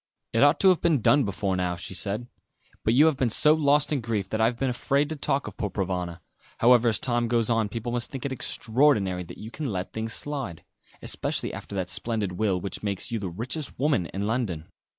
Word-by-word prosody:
"It 115 - +2
ought 145 +2 +5
to 190 - +7
have 185 - +3
been 165 -5 +3
done 140 +4 +4
before 100 -1 -1
how," 90 -1 -1
she 90 +2 -7
said, 100 +6 -1 0.6
"but 110 - +2
you 145 +4 +7
have 155 -4 +3
been 130 -3 +1
so 150 +7 +6
lost 150 -1 +3
in 140 - 0
grief, 110 -4 -2
that 110 - -1
I - - +5
have 120 +1 0
been 135 0 0
afraid 140 +4 0
to 160 - -3
talk 140 -1 -1
of - - -8
poor 105 -5 -2
Provana; 90 -3 -3 0.4
however, 120 0 +5
as 110 - +2
time 120 -2 0
goes 115 -1 +1
on 115 -2 +1
people 115 +3 -4
must 120 0 +1
think 135 -2 -6
it 140 - -2
extraordinary 110 -7 +2
that 85 - -11
you 110 +2 -9
can 145 -4 -4
let 95 -1 -4
things 110 0 -2
slide; 135 - -4 0.4
especially - - -3
after 100 - -8
that 95 -2 -2
splendid 105 +2 -2
will 95 0 0
which 95 +1 -5
makes 100 +3 -3
you 115 - -1
the 95 -3 -4
richest 125 - -4
woman 140 - +1
in 100 +1 -4
London." 105 -9 -2
115 Hz, 230 wpm, -26 LUFS, 100-135 Hz, 0.6 s, to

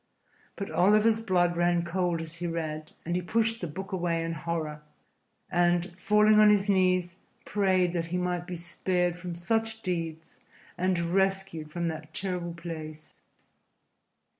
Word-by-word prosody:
But 200 - -5
Oliver's 215 +4 +4
blood 175 -5 +2
ran 175 0 +2
cold 170 -1 0
as 165 +1 -7
he 175 +1 -3
read, 155 -2 -4
and 170 +1 -1
he 180 - 0
pushed 225 +4 0
the 175 - -2
book 190 +6 -7
away 170 -3 0
in 165 0 -2
horror, 155 -2 -3 0.7
and, 175 0 +2
falling 210 +3 +4
on 215 0 +8
his 205 -1 +4
knees, 185 -2 +2 0.3
prayed 185 -3 +2
that 165 -1 -1
he 180 +2 -2
might 180 -1 -2
be 180 - -4
spared 175 +1 -1
from 175 -1 -6
such 225 +5 -1
deeds 165 -3 -4 0.4
and 185 0 +1
rescued 190 -2 0
from 170 +2 -2
that 155 0 -7
terrible 180 -3 -3
place. 155 -2 -8
175 Hz, 150 wpm, -28 LUFS, 170-190 Hz, 0.7 s, on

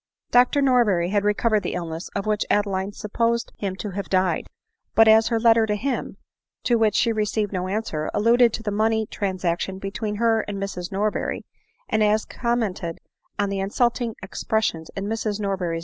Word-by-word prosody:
Dr 250 +3 +4
Norberry 210 -10 +3
had 205 -1 +1
recovered 210 +1 +2
the 175 - -3
iHness 170 0 -5
of 200 0 -2
which 215 -1 +1
Ade 205 0 +3
line 190 0 -2
supposed 230 +3 -1
him 195 -2 -2
to 205 +1 -5
have 200 +1 -5
died; 185 -3 +1 0.5
but 225 0 +7
as 220 0 +6
her 230 -1 +1
letter 225 -1 +4
to 210 - 0
him, 255 +5 -3 0.5
to 240 - +3
which 215 -2 +2
she 230 - +3
received 210 -1 -1
no 185 0 -2
answer, 185 -7 -2
alluded 235 +3 +4
to 225 - -4
the 210 - -2
money 220 +1 +1
transaction 185 -2 -2
between 210 +2 -4
her 225 0 +2
and 205 -1 -4
Mrs 195 -2 -5
Norberry; 205 +2 -1 0.4
and 215 - +2
as 210 +1 +3
she - - -14
commented 215 -8 -1 0.4
on 205 -1 0
the 195 - -2
insulting 235 +3 0
expressions 190 -4 -2
in 195 - -3
Mrs 215 -1 -2
Norber 200 -1 -1
ADELINE 190 - -4
MOWBRAY. 170 -2 -2
210 Hz, 190 wpm, -23 LUFS, 195-225 Hz, 0.5 s, but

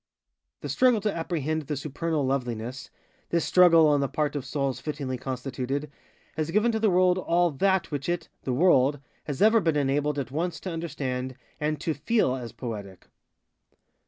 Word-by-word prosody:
The - - -5
struggle 250 -3 +4
to 210 0 -1
apprehend 160 -2 -2
the 150 -2 -2
supernal 150 +1 -2
LovelinessŌĆöthis 125 -1 -3 0.5
struggle, 165 -3 +6
on 145 -1 +3
the 140 - +1
part 150 +2 -1
of 140 -3 -3
souls 140 -1 -1
fittingly 145 -4 -4
constitutedŌĆöhas 135 +4 -5
given 215 +5 +3
to 220 - -1
the 220 -1 +3
world 180 0 +3
all 175 -2 +2
_that 190 +5 +2
_which 145 +1 -3
it 175 0 -2
(the 130 - -3
world) 140 -1 +4 0.3
has 145 +4 -1
ever 220 +1 +5
been 165 -4 +1
enabled 145 +1 0
at 130 -3 -3
once 165 +3 -2
to 185 - -4
understand 130 -6 -4 0.2
and 150 0 -1
_to 160 -2 -1
feel 210 - +1
_as 125 -3 -5
poetic. 105 -6 -7
150 Hz, 160 wpm, -27 LUFS, 130-170 Hz, 0.5 s, struggle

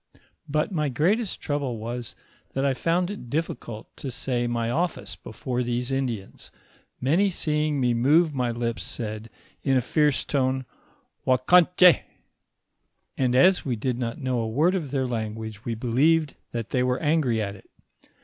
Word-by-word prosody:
But 155 +6 0
my 150 -5 0
greatest 185 - 0
trouble 140 -5 -2
was 120 +2 -5 0.4
that 135 +1 0
I 135 - +3
found 175 +7 0
it 165 -12 -8
difiScult 125 -7 -3
to 135 - -5
say 125 -1 -2
my 115 -1 -1
office 120 - -2
before 125 +5 -4
these 120 +1 -2
Indians, 120 -7 -3 0.5
many 165 +10 +3
seeing 150 -4 0
me 125 -2 +2
move 150 +7 +4
my 125 -3 0
lips 115 0 -2
said, 110 0 -5 0.3
in 135 -2 +2
a - - +3
fierce 150 +2 +1
tone, 130 -2 0 0.6
Ouackanch^; 175 +7 +6 1.2
and 125 -2 +1
as 180 +8 +5
we 125 -3 -1
did 120 +2 -2
not 115 -2 -3
know 130 -3 -1
a 110 -1 -1
word 155 +11 +2
of 170 -7 -2
their 135 -1 0
language, 110 -2 -4
we 115 - -2
believed 145 +7 +2 0.2
that 115 -2 -4
they 125 - +1
were 125 0 +1
angry 145 -7 +2
at 100 -2 -3
it. 95 - -17
130 Hz, 160 wpm, -25 LUFS, 120-150 Hz, 1.2 s, Ouackanch^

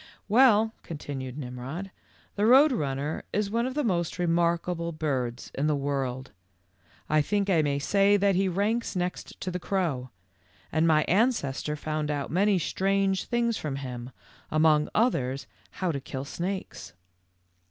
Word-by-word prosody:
* - - -30
Well," 225 -1 +5
continued 140 -4 -6
Nimrod, 135 +8 -6 0.4
"the 210 +1 +2
Road 275 +5 +7
Run 140 - -1
ner 145 +3 -3
is 205 -1 -1
one 235 +2 +1
of 260 - -5
the 295 - +1
most 175 -8 0
remarkable 170 0 0
birds 135 -6 -3
in 145 +3 0
the 150 - +2
world. 135 -2 -2 0.8
I 155 0 +3
think 200 +5 0
I 165 -4 +4
may 145 -2 0
say 200 +7 +3
that 200 0 +3
he 190 +1 +2
ranks 205 +6 0
next 180 0 -4
to 185 - -3
the 180 - -3
crow, 170 -10 -1 0.6
and 160 +2 +2
my 155 -1 +4
ancestor 175 - +1
found 155 0 -3
out 145 -2 -2
many 195 +3 +3
strange 195 +2 0
things 235 -1 0
from 150 -3 -4
him, 125 -3 -6 0.4
among 155 -1 +3
others 135 - +1 0.3
how 185 -2 -1
to 140 - -3
kill 130 +1 -6
snakes." 185 +6 -5
170 Hz, 155 wpm, -27 LUFS, 140-200 Hz, 0.8 s, Road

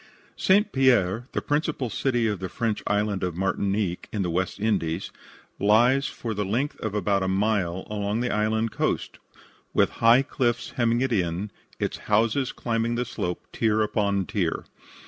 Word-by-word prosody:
St. 205 +2 +3
Pierre, 120 - +3
the - - -2
principal 145 -5 -1
city 120 0 0
of 105 -4 -1
the 95 -1 -4
French 110 +2 -2
island 105 -1 0
of 90 -2 -2
Martinique, 95 0 -1
in 105 -3 -1
the 90 - -1
West 90 +3 -1
Indies, 95 -5 -1 0.5
lies 120 +7 +4
for 115 -2 -5
the 105 0 -1
length 120 +9 -1
of 110 -2 -3
about 100 -1 +1
a 95 - 0
mile 95 -2 0
along 105 +1 -2
the 125 - -1
island 110 +1 +1
coast, - - -2 0.6
with - - +4
high 115 +4 +6
cliffs 125 -3 -1
hemming 120 0 +1
it 130 -2 +1
in, 90 +1 -1 0.3
its - - -2
houses 115 +5 +2
climbing 115 0 -1
the 125 +1 -1
slope, 90 -7 -4
tier 110 -1 +2
upon 100 -2 0
tier. - - -1
110 Hz, 165 wpm, -25 LUFS, 100-120 Hz, 0.6 s, high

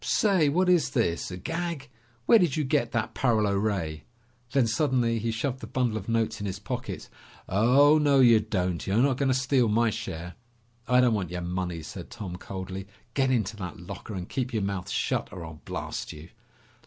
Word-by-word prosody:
"Say, 190 -8 +3
what 180 +6 +2
is 180 -3 +4
this? 85 -10 0
A 90 - -6
gag? 165 - -4 0.4
Where 230 - +7
did 170 -7 +1
you 155 - +1
get 130 -4 +1
that 110 -1 -1
paralo 110 -6 +2
ray?" 95 -7 -2 0.5
Then 135 -2 +3
suddenly 120 -1 +1
he 115 +2 -2
shoved 125 +4 -2
the 110 - -8
bundle 120 -2 0
of 110 0 -5
notes 115 -1 0
in 100 - -3
his 95 0 -3
pocket. 100 -2 -5 0.4
"Oh, 135 +9 +5
no, 145 -2 +4
you 120 -4 +7
don't! 90 -5 -2
You're 95 +2 +1
not 130 +1 +3
going 140 -1 +1
to 130 - +3
steal 130 -2 +2
my 110 +1 +2
share!" 85 -2 -5 0.5
"I 125 0 +5
don't 125 -2 +4
want 95 -6 -1
your 90 0 -4
money!" 90 -2 -3
said 90 +2 -8
Tom 105 -7 -6
coldly. 95 +1 -6 0.3
"Get 135 -1 +2
into 110 -4 0
that 90 -4 -6
locker 100 +4 -8
and 90 -1 -5
keep 125 -1 -3
your 110 -3 0
mouth 100 -2 -3
shut, - - -1
or 90 -3 -7
I'll 80 -1 -10
blast - - -4
you!" 75 +2 -11
110 Hz, 200 wpm, -27 LUFS, 95-130 Hz, 0.5 s, Where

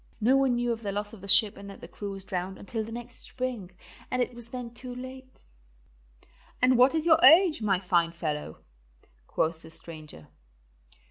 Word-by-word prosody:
No 240 +5 +4
one 270 -2 +3
knew 240 0 0
of 230 -1 -3
the 205 -3 -3
loss 205 +1 -4
of 215 - -12
the 200 - -9
ship 205 +1 +4
and 200 0 -10
that 195 - -11
the - - -10
crew 205 - -7
was 195 -1 -7
drowned 185 +1 -4
until 220 +2 -4
the 220 - -9
next 240 +1 -6
spring, 250 -8 -4 0.4
and 255 - -1
it 245 0 0
was 235 -1 -5
then 245 -1 -6
too 250 +1 -6
late." 260 +1 -9 1.3
"And 255 0 +4
what 255 +5 +5
is 320 0 0
your 320 -1 +5
age, 320 +1 +7
my 195 -4 +2
fine 175 -3 +1
fellow?" 150 - -5 0.6
quoth 160 0 -1
the 160 - -13
stranger. 155 - -9
225 Hz, 195 wpm, -28 LUFS, 190-255 Hz, 1.3 s, age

